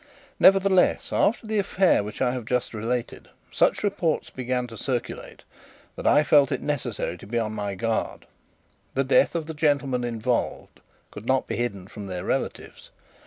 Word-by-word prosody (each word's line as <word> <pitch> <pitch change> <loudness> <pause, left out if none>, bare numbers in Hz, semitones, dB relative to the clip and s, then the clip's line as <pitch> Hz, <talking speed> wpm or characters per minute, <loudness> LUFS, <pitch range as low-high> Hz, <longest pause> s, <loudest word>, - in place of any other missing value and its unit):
Nevertheless, 195 -1 +4
after 230 +2 +2
the 215 -1 0
affray 190 -1 +3
which 105 +5 -4
I 125 - +2
have 125 -3 -5
just 125 +1 -1
related, 115 +2 -3 0.2
such - - +2
reports 195 -6 -1
began 125 -1 -2
to 115 -2 -10
circulate 125 +1 -4 0.5
that - - -3
I 150 - +5
felt 145 -2 +4
it - - 0
necessary 120 - -3
to - - -12
be 120 +3 -2
on 110 -2 -1
my 105 -2 -4
guard. 115 +4 -2 0.7
The 135 - +2
death 135 +5 +3
of 165 -2 -1
the 160 - -6
gentlemen 140 -5 +1
involved 120 0 -2 0.3
could 105 +3 -10
not 130 0 +2
be - - -4
hidden 100 -6 -3
from 100 0 -9
their 90 -2 -5
relatives. - - -4
125 Hz, 165 wpm, -25 LUFS, 110-150 Hz, 0.7 s, I